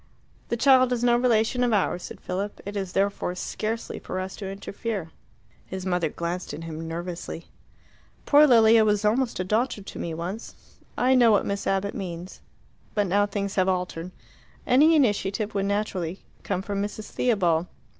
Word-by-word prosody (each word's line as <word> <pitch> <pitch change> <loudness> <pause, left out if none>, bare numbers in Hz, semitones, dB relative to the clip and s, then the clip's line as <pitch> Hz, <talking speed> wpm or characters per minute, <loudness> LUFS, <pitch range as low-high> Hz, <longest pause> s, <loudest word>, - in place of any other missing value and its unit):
"The 235 - 0
child 255 0 +5
is 245 -1 0
no 240 -1 +5
relation 240 0 +2
of 240 -2 +2
ours," 190 -3 +1
said - - -8
Philip. 195 +3 -4
"It 205 +1 -6
is 190 -3 -3
therefore 195 -2 0
scarcely 220 +4 -4
for 185 - -5
us 185 +1 -5
to 195 -2 -5
interfere." 195 -2 -5 0.5
His 190 0 -7
mother 180 -3 0
glanced 170 +3 -4
at 165 - -8
him 165 0 -6
nervously. 170 0 -6 0.8
"Poor 300 +1 +7
Lilia 225 -3 +6
was 210 -1 +1
almost 235 +2 +1
a - - +1
daughter 215 +2 0
to - - -9
me 165 -1 -3
once. 185 +7 -6 0.4
I 255 +1 +3
know 245 -3 +6
what 205 - +3
Miss 200 0 -3
Abbott 195 +1 0
means. 180 -1 -7 0.5
But 205 -1 +2
now 200 +2 +2
things 200 -1 -3
have 185 0 +3
altered. 180 -2 -2 0.6
Any 295 +6 +5
initiative 210 -6 +1
would 195 -1 0
naturally 195 -4 -2 0.2
come 185 - -2
from 200 0 -2
Mrs. 210 +1 -5
Theobald." 180 -8 +1
200 Hz, 170 wpm, -25 LUFS, 180-225 Hz, 0.8 s, Poor